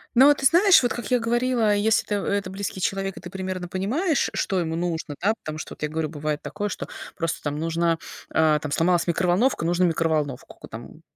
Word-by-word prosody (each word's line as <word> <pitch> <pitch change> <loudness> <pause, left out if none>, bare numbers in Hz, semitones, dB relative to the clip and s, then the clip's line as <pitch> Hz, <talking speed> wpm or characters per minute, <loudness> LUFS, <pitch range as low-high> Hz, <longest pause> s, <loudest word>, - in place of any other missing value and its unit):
Ну, 260 +3 +8
вот 290 0 +5
ты 270 - -3
знаешь, 360 +7 +6
вот 245 - +1
как 240 - -6
я 250 - +3
говорила, 235 -1 +1
если 220 +2 +2
это, 205 - -1
э, - - +1
это 195 -2 -4
близкий 195 0 -5
человек, 195 +1 -2
и - - -6
ты 175 - -9
примерно 185 -1 -4
понимаешь, 260 - 0
что 190 -3 0
ему 160 -2 -2
нужно, 165 -3 -3
да? 205 +4 +3
Потому 155 0 -6
что - - -7
вот - - -18
я 150 - -1
говорю, 155 0 -2
бывает 150 0 -3
такое, 205 0 -4
что - - -5 0.3
просто 165 -2 -2
там 145 0 -3
нужна 165 +1 0 0.3
а, 155 -1 +3
там 145 -1 -6
сломалась 170 +3 +2
микроволновка, 180 +5 +1
нужно 175 +2 +2
микроволновку 155 -5 -1
ку - - -10
там - - -10
180 Hz, 220 wpm, -24 LUFS, 160-215 Hz, 0.3 s, Ну